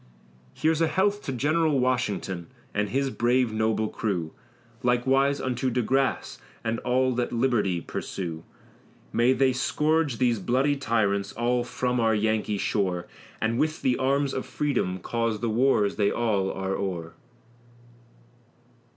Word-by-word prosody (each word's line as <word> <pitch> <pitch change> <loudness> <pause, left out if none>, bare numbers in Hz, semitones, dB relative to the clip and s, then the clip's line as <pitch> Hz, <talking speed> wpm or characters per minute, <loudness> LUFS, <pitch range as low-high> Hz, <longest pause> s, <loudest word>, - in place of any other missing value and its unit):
Here's 160 +1 +1
a 165 - +4
health 200 +4 +1
to - - -2
General 150 +3 +1
Washington, 105 -8 -1 0.3
and 105 0 0
his 135 +3 0
brave 120 -1 +1
noble 110 0 +1
crew, 90 -8 -3 0.5
Likewise 135 +3 +2
unto 130 0 -1
De 125 0 0
Grasse, 135 +3 0 0.2
and 115 0 -1
all 130 +1 +1
that 120 0 -1
liberty 115 -8 +1
pursue; 85 -3 -5 0.7
May 120 +2 +4
they 130 0 +3
scourge 150 +1 +1
these 120 -3 +2
bloody 130 +7 +1
tyrants, 110 -6 0
all 120 +1 0
from 125 0 -1
our 110 -1 +3
Yankee 105 -1 0
shore, 95 -3 -1 0.3
And 115 +2 0
with 155 +1 0
the 125 -1 +3
arms 140 +1 +1
of 130 - -4
Freedom 125 -11 -1
cause 115 +3 -2
the 115 0 -1
wars 115 -3 +2
they 100 -1 +3
are - - -3
all 105 -5 +1
o'er. 95 -4 -3
120 Hz, 140 wpm, -26 LUFS, 105-135 Hz, 0.7 s, a